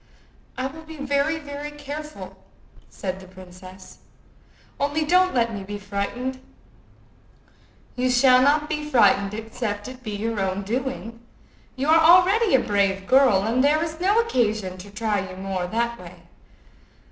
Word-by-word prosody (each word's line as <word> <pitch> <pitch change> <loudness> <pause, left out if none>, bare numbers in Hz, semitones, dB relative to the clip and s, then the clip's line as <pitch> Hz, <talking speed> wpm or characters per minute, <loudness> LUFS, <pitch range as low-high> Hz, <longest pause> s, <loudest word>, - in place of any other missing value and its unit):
"I 255 - -2
will 290 +4 -6
be 320 0 -11
very, 285 +3 0
very 290 -1 -7
careful," 295 +1 -9 0.5
said 190 -1 -5
the 190 - -13
princess. 185 0 -13 0.8
"Only 290 +2 0
don't 365 +2 +3
let 230 -2 +1
me 200 -2 -5
be 205 +1 -6
frightened." 205 +6 -4 1.5
"You 255 +1 0
shall 255 0 +5
not 295 +3 +3
be 300 -1 -3
frightened, 210 -6 +3
except 220 -2 -5
it 255 0 -10
be 215 -4 -5
your 220 +1 -3
own 195 +1 -2
doing. 230 +1 -4 0.6
You 265 +2 -2
are 325 +1 +6
already 360 - +5
a - - +5
brave 195 -3 0
girl, 255 -7 +4
and 235 +5 +1
there 305 +3 +3
is 320 -1 -6
no 400 +5 +3
occasion 215 - -1
to 195 +3 -10
try 210 0 -1
you 185 - -9
more 190 -1 -3
that 235 +3 -2
way. - - -13
250 Hz, 150 wpm, -23 LUFS, 200-295 Hz, 1.5 s, are